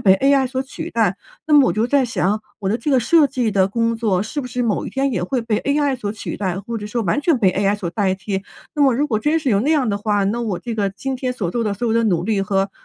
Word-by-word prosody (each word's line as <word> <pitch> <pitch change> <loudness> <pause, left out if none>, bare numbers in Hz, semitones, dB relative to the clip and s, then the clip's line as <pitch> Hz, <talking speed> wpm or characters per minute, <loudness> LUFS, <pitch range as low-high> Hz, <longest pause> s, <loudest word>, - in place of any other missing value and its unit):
被 190 -2 +5
ai 275 +3 +3
所 260 +1 -2
取 315 +4 -7
代。 205 -5 +1 0.3
那 310 - -1
么 290 -3 +7
我 - - +1
就 220 +2 +1
在 275 +1 +2
想， 210 -2 0 0.2
我 195 - -2
的 225 - 0
这 295 - -2
个 265 - +4
设 305 +5 +4
计 250 -4 -1
的 195 -2 +2
工 230 +2 0
作 205 -5 0
是 260 +8 -4
不 255 - -6
是 250 0 -3
某 225 -4 -1
一 - - -6
天 270 0 0
也 185 -6 -1
会 240 +7 -1
被 225 -2 -1
ai 285 -1 +1
所 210 -5 -4
取 215 - -6
代， 185 -3 -2
或 230 +4 -5
者 210 - -6
说 230 +2 -2
完 215 +9 0
全 310 0 +2
被 190 -5 +3
ai 200 +2 +1
所 195 -4 -4
代 195 -1 0
替。 190 +1 -4 0.3
那 295 - -3
么 270 -3 +4
如 285 +5 +1
果 220 -7 0
真 300 +8 +1
是 300 - -2
有 200 -2 +3
那 275 +8 0
样 290 -6 +2
的 200 - 0
话， 205 -1 0
那 215 +5 -1
我 210 -7 -2
这 235 -2 -5
个 205 -2 0
今 265 +7 -4
天 255 0 -2
所 190 -8 -2
做 235 +5 -1
的 210 - 0
所 240 +5 -3
有 - - +1
的 230 - +3
努 175 -5 +1
力 210 -1 0
和 195 0 0
225 Hz, 335 characters per minute, -20 LUFS, 200-265 Hz, 0.3 s, 么